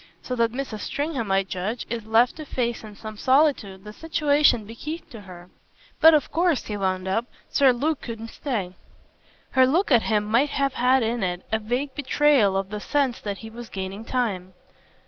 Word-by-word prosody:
So 250 - -3
that 230 -1 +2
Mrs. 250 -4 -5
Stringham, 280 -5 -3
I 195 0 +3
judge, 195 +5 -4
is 230 -2 -5
left 230 +5 +3
to 310 - -7
face 240 -4 -2
in 210 -1 -10
some 215 0 -9
solitude 260 -8 +2
the 210 0 -9
situation 295 -6 +2
bequeathed 300 +10 -7
to 225 - -9
her. 180 -2 -13 0.5
But 320 -1 +8
of 300 - 0
course," 340 -4 +1
he 210 - -4
wound 190 -2 -1
up, 225 +5 0 0.2
"Sir 275 -2 +5
Luke 285 +5 -1
couldn't 230 -1 -7
stay." 205 -10 -3 0.8
Her 260 -1 +5
look 330 +6 +1
at 240 -3 +6
him 215 -2 +1
might 235 +7 +2
have 275 -1 0
had 255 0 +3
in 230 +1 -1
it 180 -1 -2
a 220 - +1
vague 250 +6 -2
betrayal 275 -7 +3
of 195 +1 -3
the 210 - -4
sense 270 +2 0
that 200 -1 -4
he 225 - -9
was 235 0 -9
gaining 195 +2 -5
time. 195 -8 -2
230 Hz, 190 wpm, -24 LUFS, 205-275 Hz, 0.8 s, But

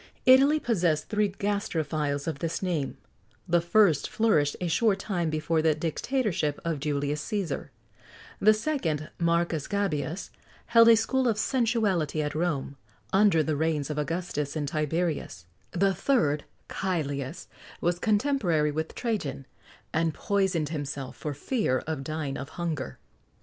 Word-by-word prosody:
Italy 275 +4 +6
possessed 170 - 0
three 210 -1 +2
gastrophiles 160 -8 -2
of 155 -4 -3
this 165 +4 -3
name: 165 -7 -1 0.5
the 175 0 +3
first 175 -1 +3
flourished 155 -11 +2
a 180 - -2
short 195 +5 +2
time 180 -5 -2
before 155 +1 0
the 155 -1 +3
dictatorship 165 - -1
of 165 -3 -1
Julius 145 0 -1
Cæsar; 195 -9 -3 0.7
the 215 - +6
second, 200 - -2
Marcus 170 -2 +1
Gabius, 175 -5 -2 0.3
held 230 -1 +6
a 230 - +9
school 260 +4 +1
of 225 -3 +1
sensuality 215 - +1
at 150 - -3
Rome, 155 -4 -2 0.4
under 195 -5 +5
the 155 0 -1
reigns 155 -1 0
of 150 - -2
Augustus 165 -2 -2
and 150 -2 -2
Tiberius; 155 - -2 0.2
the 195 +2 +2
third, 155 - +1 0.2
Cælius, 150 -5 -3 0.3
was 175 0 0
contemporary 205 - +2
with 160 +2 -4
Trajan, 175 - -3 0.5
and 165 -1 +1
poisoned 190 -7 0
himself 140 -4 -5
for 150 -2 -5
fear 175 - 0
of 155 -4 -3
dying 155 -2 -3
of 135 +2 -6
hunger. 160 -7 -3
165 Hz, 135 wpm, -27 LUFS, 150-200 Hz, 0.7 s, a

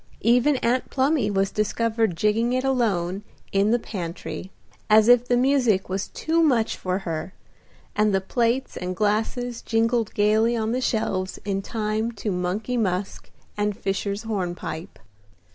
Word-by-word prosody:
Even 245 +6 +4
Aunt 245 +2 +1
Plumy 265 -4 +1
was 195 -1 +1
discovered 220 -2 0
jigging 220 +6 +1
it 255 0 0
alone 205 -8 0 0.3
in 200 +1 +2
the 235 - +4
pantry, 180 -4 -6 0.4
as 215 +1 +6
if 245 0 +6
the 245 - +3
music 245 -8 +2
was 190 +1 -2
too 330 +1 0
much 245 -8 +2
for 185 0 -2
her, 170 -1 -5 0.6
and 210 0 +3
the 195 - +2
plates 235 +6 0
and 180 +1 -4
glasses 225 +4 -1
jingled 230 0 +1
gaily 220 +3 +3
on 220 0 -1
the 255 +2 -1
shelves 190 -6 -1
in 195 -1 -1
time 215 +1 -2
to 210 -1 -3
Money 190 +7 -2
Musk 190 -3 -2 0.3
and 205 -1 -1
Fishers' 200 +2 -2
Hornpipe. 180 -5 -4
215 Hz, 145 wpm, -24 LUFS, 195-240 Hz, 0.6 s, as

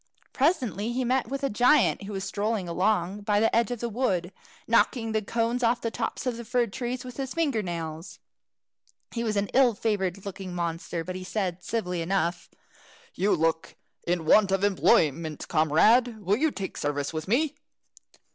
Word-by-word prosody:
Presently 245 - 0
he 255 +1 0
met 255 +1 +1
with 275 +1 -4
a 275 - +1
giant, 245 +5 +4
who 205 - -6
was 195 -1 -3
strolling 205 -1 -2
along 185 +2 0
by 205 0 +1
the 225 - +2
edge 230 -2 +3
of 245 -2 -4
the 235 - -1
wood, 195 -7 -1 0.3
knocking 230 0 +2
the 220 0 +1
cones 230 +3 -1
off 235 0 +2
the 230 -1 -3
tops - - -3
of 245 -2 -1
the 235 - -6
fir 245 +1 +1
trees 245 +4 -4
with 250 -1 -9
his 265 -2 -4
finger 290 -9 +1
nails. 165 -1 -6 0.9
He 235 - -3
was 220 -2 -1
an 200 0 0
ill 255 -3 +4
favoured 195 -3 -1
looking 190 -2 -6
monster, 170 -1 -3
but 185 +2 -6
he 185 - -6
said, 185 -2 -3
civilly 180 -5 -2
enough, 175 0 -1 0.6
"You 195 +1 +2
look 160 0 -1 0.3
in 170 -2 0
want 195 +4 +5
of 195 0 +1
employment, 160 -5 +2
comrade. 215 - +3
Will 200 +1 +1
you 315 +5 +2
take 195 -9 -6
service 145 +1 -2
with 155 +1 -4
me?" 280 +8 +1
205 Hz, 180 wpm, -27 LUFS, 180-240 Hz, 0.9 s, want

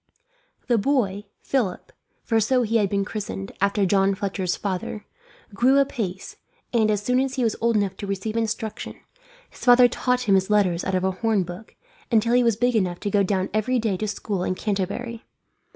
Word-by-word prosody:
The 240 -3 +2
boy, 205 -5 0 0.2
Philip 230 -10 -1 0.3
for 225 -1 +1
so 250 +3 +2
he 230 0 +1
had 205 -3 +1
been 200 0 0
christened, 95 - -5
after 200 0 +2
John 195 +1 +2
Fletcher's 190 -2 -2
father 200 +1 -4 0.5
grew 255 +7 +4
apace 245 - -2 0.4
and, 220 -2 +3
as 210 -1 0
soon 250 +3 +2
as 265 0 -1
he 260 - 0
was 225 -3 +1
old 230 0 +2
enough 200 -2 0
to 200 - -6
receive 200 +3 -3
instruction, 220 -1 -3 0.6
his - - -13
father 245 0 +7
taught 250 +1 0
him 215 -5 +2
his 190 0 +2
letters 190 -5 +2
out 190 - -1
of 185 - 0
a 190 - +2
horn 210 +1 0
book, 180 +5 -10 0.4
until 230 +1 +3
he 250 - +5
was 230 -3 +2
big 245 +2 +1
enough 180 -5 0
to 205 - -2
go 205 - +3
down 190 -1 0
every 215 +4 +1
day 220 -4 0
to 215 - -3
school 200 -2 -3
in 185 - -1
Canterbury. 215 +4 -3
210 Hz, 195 wpm, -24 LUFS, 195-235 Hz, 0.6 s, father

